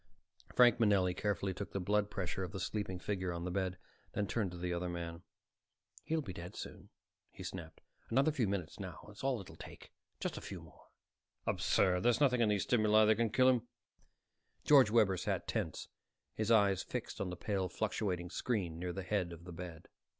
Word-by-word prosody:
Frank 120 -2 +6
Manelli 100 -5 +4
carefully 100 -1 -1
took 100 +2 -6
the 100 - -1
blood 105 +2 +1
pressure 95 -2 -3
of 95 +2 -5
the 95 - -4
sleeping 100 -1 -2
figure 95 +1 -2
on 85 0 -4
the 90 - -2
bed; 95 -1 -1 0.4
then 105 - 0
turned 105 -1 -1
to 90 - -8
the 90 0 -2
other 90 +1 -2
man. 85 -1 -5 0.8
"He'll 160 -1 0
be 95 - -6
dead 85 +1 -8
soon," - - -8 0.4
he - - -10
snapped. 80 -4 -7 0.3
"Another 135 +6 +3
few 130 -8 +1
minutes 95 -5 -3
now 95 -5 -7
is 105 +4 -12
all 135 -3 +1
it'll 95 - -10
take. - - -11 0.3
Just - - -3
a - - -5
few - - -6
more." - - -16 0.6
"Absurd. 90 -1 +2
There's 120 +3 +3
nothing 125 -4 +4
in 110 - +4
these 105 -2 +2
stimuli 110 -2 +4
that 110 - +6
can 115 +1 +1
kill 130 +4 +4
him." 125 -2 +3 1.0
George 135 -7 +7
Webber 105 -4 +4
sat - - -2
tense, - - -2 0.5
his 110 0 -2
eyes 100 -4 +5
fixed - - -5
on 95 - -1
the 90 - -5
pale 95 -2 -1
fluctuating 90 -4 -2
screen 95 -11 -1
near 90 0 -3
the 95 - -4
head 95 -2 0
of 85 0 -10
the 90 0 -9
bed. 85 -2 -8
100 Hz, 195 wpm, -35 LUFS, 90-110 Hz, 1.0 s, George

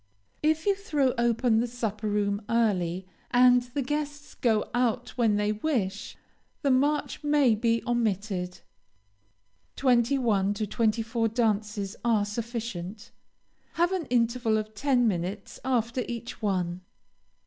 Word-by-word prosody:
If 315 +1 +1
you 405 - +4
throw 300 - 0
open 235 -1 +2
the 240 - 0
supper 220 -3 -3
room, 205 0 0
early, 190 -6 +1 0.2
and 245 0 +6
the 250 +3 -4
guests 295 +1 -4
go 220 -3 +1
out 245 -2 0
when 230 -4 +1
they 210 0 +1
wish, 215 -4 -2 0.5
the 280 - +3
march 290 +4 +1
may 290 -5 +4
be 230 +1 +1
omitted. 200 -6 -1 1.1
Twenty 250 0 +3
one 205 -5 +1
to 215 - -1
twenty 225 +1 0
four 225 0 0
dances 210 -3 -1
are 225 -4 +2
sufficient. 220 -2 -5 0.6
Have 345 +2 +2
an 365 -6 -2
interval 235 -2 +1
of 215 0 -4
ten 245 +1 +2
minutes 190 +1 -3
after 245 -1 0
each 235 0 -6
one. 185 -4 -1
230 Hz, 130 wpm, -27 LUFS, 210-250 Hz, 1.1 s, and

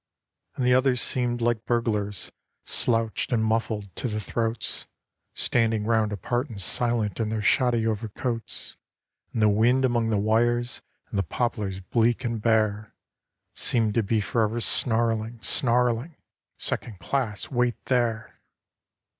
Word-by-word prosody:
And 130 - -1
the 125 - +5
others 130 0 +3
seemed 120 0 -1
like 115 -1 0
burglars, 105 -5 -1 0.3
slouched 115 -2 0
and 110 -2 +2
muffled 110 -3 -1
to - - -1
the 105 -2 -2
throats, 115 +3 -3 0.5
Standing 115 -3 +1
round 110 -2 +2
apart 120 - -2
and 110 -4 -7
silent 115 +2 +1
in 110 -2 0
their 110 -1 -2
shoddy 120 0 +3
overcoats, 115 +2 -3 0.5
And 110 - 0
the - - +6
wind 120 +6 +3
among 120 -2 +1
the 110 - +2
wires, 120 +4 +1 0.3
and 105 -6 -1
the - - +2
poplars 100 -2 -2
bleak 115 +5 +1
and 115 -3 -2
bare, 110 -1 +1 0.6
Seemed 110 -3 +1
to 115 - +3
be 110 +1 +1
for 115 +3 0
ever 110 +2 0
snarling, 115 0 +1
snarling 125 +4 +1 0.4
'Second 110 -4 -3
class 105 +1 -2
wait 125 -2 +1
there. 120 -4 -1
115 Hz, 140 wpm, -26 LUFS, 110-120 Hz, 0.6 s, the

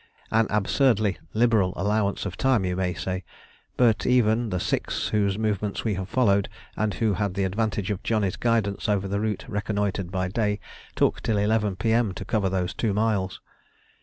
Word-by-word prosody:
An 110 0 +3
absurdly 105 -1 +2 0.2
liberal 110 -5 +3
allowance 100 +1 0
of 95 -3 -4
time 130 -6 +2
you 90 -1 -1
may 90 -1 -1
say; 95 +3 -3 0.5
but 115 -4 +3
even 120 -2 +3
the 90 - -1
six - - -1
whose 100 -2 +1
movements 105 -2 -1
we 110 - 0
have 95 0 -4
followed, 100 -6 +2 0.3
and 110 -1 -1
who 110 -3 +1
had 100 -1 -1
the 100 - 0
advantage 105 +1 -1
of 100 -1 -3
Johnny's 105 -4 0
guidance 110 -4 0
over 100 -2 +1
a 100 +1 -1
route 105 -2 -2
reconnoitred 105 -4 -2
by 95 -1 -1
day, 105 +1 0 0.4
took - - +2
till 110 - 0
11 105 -1 +1
P.M. 110 -1 +1
to 95 - -6
cover 100 -1 0
these 90 -1 -1
two 105 -4 -1
miles. 105 -3 0
105 Hz, 175 wpm, -25 LUFS, 95-110 Hz, 0.5 s, An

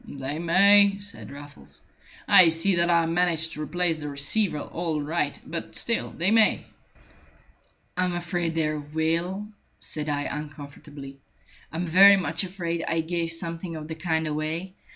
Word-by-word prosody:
"They 140 +2 -5
may," 200 +4 +5
said 200 0 -7
Raffles. 145 +1 -12 0.4
"I 175 -3 +7
see 165 +5 +1
that 170 0 +2
I 170 -1 +3
managed 165 -1 0
to 155 - -7
replace 165 +1 -1
the 150 - -5
receiver 150 +6 +1
all 165 0 -3
right. 150 0 -2
But 165 -1 -6
still 235 - 0
they 175 +5 0
may." 220 -1 +3 1.3
"I'm 180 -1 -1
afraid 175 -1 -3
they 155 -1 0
will," 165 +7 -2 0.3
said 150 -1 -5
I, 145 0 -1
uncomfortably. 145 -1 -9 0.5
"I'm 165 +3 -3
very 195 +4 +7
much 165 -2 -1
afraid 170 -3 -4
I 165 0 0
gave 165 0 -3
something 165 0 -5
of 155 -1 -7
the 160 - -5
kind 160 -1 -1
away. 155 +4 -4
165 Hz, 150 wpm, -25 LUFS, 150-180 Hz, 1.3 s, I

